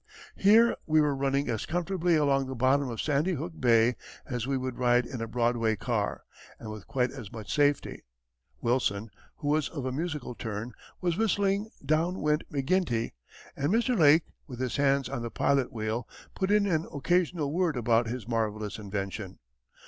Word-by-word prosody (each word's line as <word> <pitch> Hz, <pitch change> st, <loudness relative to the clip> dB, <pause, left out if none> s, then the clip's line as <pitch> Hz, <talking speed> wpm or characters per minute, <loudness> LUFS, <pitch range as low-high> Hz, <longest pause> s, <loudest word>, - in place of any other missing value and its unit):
Here 225 Hz, +4 st, +5 dB
we 155 Hz, 0 st, +4 dB
were 150 Hz, -2 st, +2 dB
running 140 Hz, +1 st, 0 dB
as 110 Hz, -3 st, -2 dB
comfortably 175 Hz, 0 st, +1 dB
along 140 Hz, -3 st, +2 dB
the 130 Hz, -, -5 dB
bottom 130 Hz, +2 st, +2 dB
of 115 Hz, -2 st, -5 dB
Sandy 155 Hz, +5 st, +1 dB
Hook 165 Hz, +3 st, -4 dB
Bay 120 Hz, -1 st, +4 dB, 0.3 s
as 125 Hz, -3 st, -3 dB
we 135 Hz, -1 st, 0 dB
would 130 Hz, -1 st, -4 dB
ride 120 Hz, -1 st, +3 dB
in 120 Hz, 0 st, -6 dB
a 115 Hz, -, -2 dB
Broadway 115 Hz, -1 st, +1 dB
car, -, -, -2 dB, 0.4 s
and 110 Hz, -, -7 dB
with 105 Hz, -3 st, -9 dB
quite 125 Hz, -3 st, 0 dB
as 105 Hz, -, -9 dB
much 110 Hz, -4 st, -6 dB
safety. 145 Hz, -1 st, +1 dB, 0.6 s
Wilson, 115 Hz, -3 st, 0 dB, 0.2 s
who 145 Hz, -, -4 dB
was 150 Hz, 0 st, +1 dB
of 140 Hz, -6 st, -5 dB
a 130 Hz, -, -1 dB
musical 150 Hz, -3 st, -3 dB
turn, 110 Hz, 0 st, -5 dB, 0.3 s
was 175 Hz, -2 st, 0 dB
whistling 205 Hz, -1 st, +1 dB, 0.2 s
Down 165 Hz, +4 st, +1 dB
Went 150 Hz, +1 st, 0 dB
McGinty, 135 Hz, -4 st, 0 dB, 0.4 s
and 145 Hz, +5 st, 0 dB
Mr. 240 Hz, +3 st, +2 dB
Lake, 155 Hz, -3 st, +6 dB, 0.2 s
with 125 Hz, -4 st, -8 dB
his 130 Hz, -2 st, -2 dB
hands 140 Hz, -1 st, +2 dB
on -, -, -4 dB
the 115 Hz, -, -4 dB
pilot 135 Hz, +2 st, +1 dB
wheel, 110 Hz, +1 st, -3 dB, 0.3 s
put 190 Hz, -, -1 dB
in 210 Hz, 0 st, +4 dB
an 165 Hz, -4 st, 0 dB
occasional 165 Hz, -1 st, 0 dB
word 170 Hz, -5 st, +1 dB
about 115 Hz, -1 st, +2 dB
his 115 Hz, -2 st, -5 dB
marvellous 110 Hz, -2 st, -2 dB
invention. 100 Hz, -1 st, -5 dB
135 Hz, 175 wpm, -28 LUFS, 115-160 Hz, 0.6 s, Lake